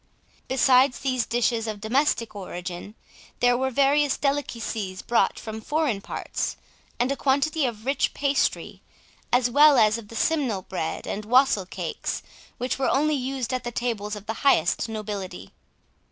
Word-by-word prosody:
Besides 260 Hz, 0 st, +4 dB
these 255 Hz, -3 st, 0 dB
dishes 230 Hz, -1 st, 0 dB
of 215 Hz, -2 st, -4 dB
domestic 230 Hz, 0 st, 0 dB
origin, 180 Hz, +1 st, -7 dB, 0.4 s
there 245 Hz, 0 st, +4 dB
were 265 Hz, +2 st, 0 dB
various 280 Hz, +2 st, +3 dB
delicacies 230 Hz, -9 st, -2 dB
brought 235 Hz, -, +2 dB
from 220 Hz, -1 st, -7 dB
foreign 290 Hz, -6 st, 0 dB
parts, -, -, -4 dB, 0.4 s
and 250 Hz, +2 st, +1 dB
a -, -, 0 dB
quantity 280 Hz, +2 st, +1 dB
of 225 Hz, -2 st, -6 dB
rich 275 Hz, +2 st, 0 dB
pastry, 280 Hz, 0 st, 0 dB, 0.5 s
as 245 Hz, 0 st, +4 dB
well 290 Hz, +3 st, +6 dB
as 215 Hz, 0 st, +4 dB
of 215 Hz, -, -12 dB
the 230 Hz, -, -11 dB
simnel 250 Hz, -9 st, 0 dB
bread 180 Hz, -4 st, -4 dB
and 210 Hz, -, -4 dB
wastle 230 Hz, -4 st, +3 dB
cakes, -, -, -4 dB, 0.3 s
which 250 Hz, +2 st, -2 dB
were 265 Hz, -, +1 dB
only 305 Hz, +3 st, +2 dB
used 265 Hz, -2 st, -2 dB
at 255 Hz, -1 st, -2 dB
the 240 Hz, -, -4 dB
tables 220 Hz, -4 st, -2 dB
of 205 Hz, -1 st, -10 dB
the 225 Hz, -, -3 dB
highest 225 Hz, -, +3 dB
nobility. 200 Hz, -, -6 dB
245 Hz, 155 wpm, -25 LUFS, 215-275 Hz, 0.5 s, well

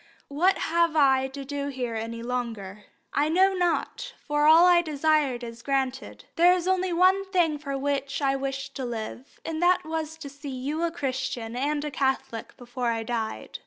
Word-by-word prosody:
What 350 Hz, +8 st, +2 dB
have 335 Hz, 0 st, +1 dB
I 265 Hz, -3 st, +4 dB
to 275 Hz, +1 st, -8 dB
do 285 Hz, 0 st, -3 dB
here 255 Hz, -4 st, -3 dB
any 230 Hz, +1 st, -5 dB
longer? 225 Hz, -5 st, -4 dB, 0.3 s
I 295 Hz, +2 st, +2 dB
know 380 Hz, +4 st, +4 dB
not, 365 Hz, +7 st, -1 dB
for 295 Hz, 0 st, +2 dB
all 325 Hz, +3 st, +8 dB
I 350 Hz, -1 st, +6 dB
desired 300 Hz, -5 st, +1 dB
is 230 Hz, -1 st, -8 dB
granted. 265 Hz, 0 st, -2 dB
There 350 Hz, +2 st, +6 dB
was 360 Hz, 0 st, -3 dB
only 375 Hz, -1 st, +1 dB
one 370 Hz, +3 st, +4 dB
thing 345 Hz, -6 st, +1 dB
for 280 Hz, -2 st, -4 dB
which 275 Hz, 0 st, -2 dB
I 275 Hz, -2 st, +1 dB
wished 270 Hz, 0 st, -4 dB
to 265 Hz, -, -4 dB
live, 240 Hz, +2 st, -6 dB
and 320 Hz, 0 st, -3 dB
that 360 Hz, 0 st, +3 dB
was 320 Hz, 0 st, -4 dB
to 310 Hz, -3 st, -8 dB
see 285 Hz, +1 st, -9 dB
you 275 Hz, +5 st, -3 dB
a 340 Hz, -, +1 dB
Christian 260 Hz, -6 st, -3 dB
and 290 Hz, +3 st, -1 dB
a 300 Hz, -, -3 dB
Catholic 265 Hz, -4 st, -2 dB
before 245 Hz, 0 st, -4 dB
I 225 Hz, -1 st, 0 dB
died. 225 Hz, -1 st, -4 dB
280 Hz, 185 wpm, -26 LUFS, 255-325 Hz, 0.3 s, all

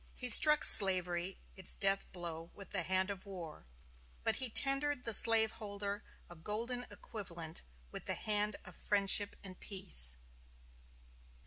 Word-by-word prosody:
He 250 Hz, -, 0 dB
struck 300 Hz, +6 st, +6 dB
slavery 180 Hz, -1 st, +7 dB, 0.2 s
its 190 Hz, -2 st, -5 dB
death 195 Hz, 0 st, -3 dB
blow 170 Hz, -2 st, -11 dB
with 200 Hz, -3 st, -16 dB
the -, -, -4 dB
hand 190 Hz, +1 st, -4 dB
of 195 Hz, 0 st, -10 dB
war, 170 Hz, -, -13 dB, 0.6 s
but -, -, -2 dB
he 260 Hz, -, -4 dB
tendered 275 Hz, +2 st, 0 dB
the 230 Hz, -, -3 dB
slaveholder 210 Hz, -2 st, -2 dB, 0.2 s
a 175 Hz, -, -17 dB
golden 230 Hz, +8 st, -8 dB
equivalent 170 Hz, -6 st, -10 dB, 0.3 s
with -, -, -12 dB
the -, -, -2 dB
hand 210 Hz, 0 st, -4 dB
of -, -, -17 dB
friendship 205 Hz, 0 st, -1 dB
and 185 Hz, -2 st, -14 dB
peace. 60 Hz, -, -1 dB
200 Hz, 135 wpm, -30 LUFS, 180-220 Hz, 0.6 s, slavery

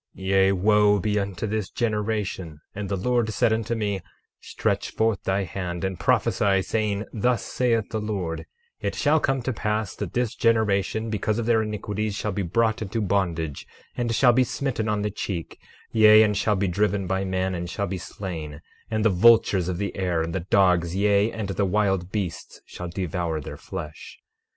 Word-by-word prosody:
12:2 95 Hz, -, -8 dB
Yea, 95 Hz, 0 st, +4 dB
wo 105 Hz, +2 st, +4 dB
be 105 Hz, +2 st, 0 dB
unto 100 Hz, 0 st, -3 dB
this 105 Hz, -3 st, -2 dB
generation! 105 Hz, -, -2 dB
And 100 Hz, -1 st, -5 dB
the 100 Hz, -, -1 dB
Lord 120 Hz, +3 st, +1 dB
said 110 Hz, +1 st, +2 dB
unto 115 Hz, +1 st, -1 dB
me: 100 Hz, -4 st, -2 dB, 0.4 s
Stretch -, -, -2 dB
forth 110 Hz, -2 st, 0 dB
thy 95 Hz, +1 st, +1 dB
hand 90 Hz, -1 st, -5 dB
and 95 Hz, -2 st, -2 dB
prophesy 95 Hz, -2 st, +2 dB
saying: 105 Hz, -1 st, -1 dB
Thus 120 Hz, +2 st, +1 dB
saith 115 Hz, -4 st, 0 dB
the 110 Hz, -, -2 dB
Lord, 95 Hz, -6 st, -3 dB, 0.3 s
it -, -, -3 dB
shall 150 Hz, +2 st, +3 dB
come 135 Hz, -3 st, 0 dB
to 130 Hz, -, -1 dB
pass 105 Hz, -2 st, -2 dB
that 95 Hz, -3 st, -5 dB
this 120 Hz, -2 st, 0 dB
generation, 110 Hz, -1 st, +1 dB
because 105 Hz, 0 st, -1 dB
of 120 Hz, -, -1 dB
their 115 Hz, -1 st, +3 dB
iniquities, 105 Hz, -1 st, -3 dB
shall 105 Hz, 0 st, -2 dB
be 100 Hz, -, -2 dB
brought 110 Hz, +5 st, +1 dB
into 110 Hz, +2 st, -3 dB
bondage, 85 Hz, -7 st, -1 dB, 0.3 s
and 120 Hz, -2 st, -1 dB
shall 120 Hz, +2 st, +5 dB
be 130 Hz, +2 st, +4 dB
smitten 125 Hz, -3 st, -2 dB
on 105 Hz, -1 st, 0 dB
the 105 Hz, -, -1 dB
cheek; 95 Hz, -4 st, -5 dB, 0.3 s
yea, 110 Hz, -1 st, +7 dB
and 105 Hz, -1 st, +1 dB
shall 105 Hz, +1 st, +1 dB
be 100 Hz, +1 st, 0 dB
driven 100 Hz, +1 st, 0 dB
by 95 Hz, +1 st, -1 dB
men, 95 Hz, 0 st, -1 dB
and 85 Hz, -1 st, -4 dB
shall 100 Hz, +4 st, -2 dB
be 95 Hz, -1 st, -4 dB
slain; 80 Hz, -5 st, -6 dB, 0.3 s
and 110 Hz, -1 st, -1 dB
the -, -, +6 dB
vultures 95 Hz, -2 st, +4 dB
of 90 Hz, -, -2 dB
the 100 Hz, +1 st, -3 dB
air, 90 Hz, -4 st, 0 dB
and 85 Hz, +1 st, -4 dB
the 95 Hz, -, -1 dB
dogs, 90 Hz, -3 st, +3 dB
yea, 100 Hz, +2 st, +3 dB
and 110 Hz, -3 st, -4 dB
the 100 Hz, +1 st, 0 dB
wild 95 Hz, -2 st, +1 dB
beasts, 95 Hz, -6 st, -4 dB
shall 90 Hz, -, -7 dB
devour 85 Hz, -2 st, -2 dB
their 75 Hz, -, -7 dB
flesh. 75 Hz, 0 st, -8 dB
100 Hz, 190 wpm, -25 LUFS, 95-110 Hz, 0.4 s, yea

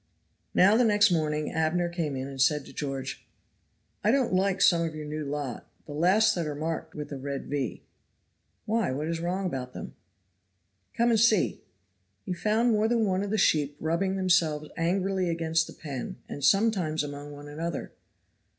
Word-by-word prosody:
Now 195 Hz, +4 st, +6 dB
the 245 Hz, -, +4 dB
next 210 Hz, -2 st, +4 dB
morning 155 Hz, -2 st, 0 dB
Abner 160 Hz, +2 st, +1 dB
came 165 Hz, -5 st, -3 dB
in 130 Hz, 0 st, -4 dB
and 135 Hz, -1 st, -4 dB
said 145 Hz, +1 st, +3 dB
to -, -, -12 dB
George, 135 Hz, -3 st, -4 dB, 0.8 s
"I 210 Hz, -, +3 dB
don't 255 Hz, -3 st, +2 dB
like 190 Hz, +1 st, +2 dB
some 175 Hz, -3 st, +5 dB
of 165 Hz, -2 st, -2 dB
your 155 Hz, -1 st, -6 dB
new 155 Hz, +1 st, -4 dB
lot 140 Hz, -3 st, -5 dB, 0.2 s
the 145 Hz, -, -8 dB
last 185 Hz, +8 st, +4 dB
that 170 Hz, -3 st, -2 dB
are 150 Hz, -, -3 dB
marked 160 Hz, +2 st, -4 dB
with 150 Hz, 0 st, -6 dB
a 140 Hz, -, -4 dB
red 140 Hz, 0 st, -4 dB
V." 140 Hz, -4 st, -3 dB, 0.8 s
"Why, 220 Hz, -, +1 dB
what 145 Hz, +4 st, -3 dB
is 165 Hz, 0 st, -2 dB
wrong 180 Hz, +3 st, -2 dB
about 130 Hz, -7 st, -4 dB
them?" -, -, -7 dB, 1.0 s
"Come 235 Hz, 0 st, +3 dB
and 225 Hz, -, +3 dB
see." 220 Hz, -3 st, +3 dB, 0.6 s
He 185 Hz, -, -2 dB
found 220 Hz, +6 st, +2 dB
more 215 Hz, 0 st, +3 dB
than 230 Hz, -1 st, +2 dB
one 190 Hz, -1 st, +1 dB
of 200 Hz, -, -3 dB
the 215 Hz, -, 0 dB
new 210 Hz, -, +4 dB
sheep 145 Hz, -2 st, +1 dB
rubbing 170 Hz, +5 st, 0 dB
themselves 170 Hz, -5 st, +2 dB
angrily 185 Hz, +2 st, 0 dB
against 165 Hz, -1 st, 0 dB
the -, -, -10 dB
pen, 140 Hz, -5 st, -6 dB
and 145 Hz, -, -7 dB
sometimes 190 Hz, -5 st, +2 dB
among 145 Hz, 0 st, -7 dB
one 145 Hz, 0 st, -10 dB
another. 160 Hz, +2 st, -4 dB
165 Hz, 185 wpm, -28 LUFS, 150-195 Hz, 1.0 s, Now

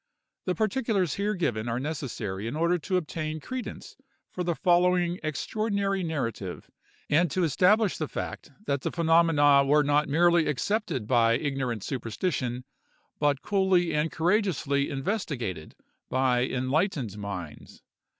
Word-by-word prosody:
The 180 Hz, -, 0 dB
particulars 215 Hz, -, 0 dB
here 205 Hz, +1 st, -1 dB
given 120 Hz, -, -1 dB
are 115 Hz, +1 st, -1 dB
necessary 115 Hz, -9 st, -4 dB
in 120 Hz, -, -4 dB
order 170 Hz, +3 st, +1 dB
to 185 Hz, +4 st, -1 dB
obtain 155 Hz, -2 st, -3 dB
credence 255 Hz, -, -7 dB, 0.3 s
for 180 Hz, -, -3 dB
the 170 Hz, -1 st, -1 dB
following 180 Hz, -1 st, +2 dB
extraordinary 195 Hz, -, -1 dB
narrative; 115 Hz, -, -4 dB, 0.4 s
and 165 Hz, +3 st, +3 dB
to 185 Hz, +5 st, 0 dB
establish 185 Hz, -, +3 dB
the 155 Hz, -, -1 dB
fact -, -, -6 dB, 0.2 s
that 140 Hz, -1 st, -1 dB
the -, -, -1 dB
phenomena 165 Hz, -4 st, +4 dB
were 150 Hz, +2 st, +4 dB
not 145 Hz, +1 st, +2 dB
merely 170 Hz, +2 st, +4 dB
accepted 150 Hz, -, -1 dB
by 115 Hz, -1 st, +3 dB
ignorant 130 Hz, -5 st, -2 dB
superstition, 125 Hz, -, -3 dB, 0.6 s
but 145 Hz, -2 st, +1 dB
coolly 190 Hz, -3 st, +2 dB
and 150 Hz, +1 st, 0 dB
courageously 160 Hz, -6 st, +1 dB
investigated 135 Hz, -, -3 dB, 0.3 s
by 130 Hz, -1 st, +2 dB
enlightened 130 Hz, -, -1 dB
minds. 95 Hz, -7 st, -8 dB
155 Hz, 130 wpm, -27 LUFS, 130-180 Hz, 0.6 s, phenomena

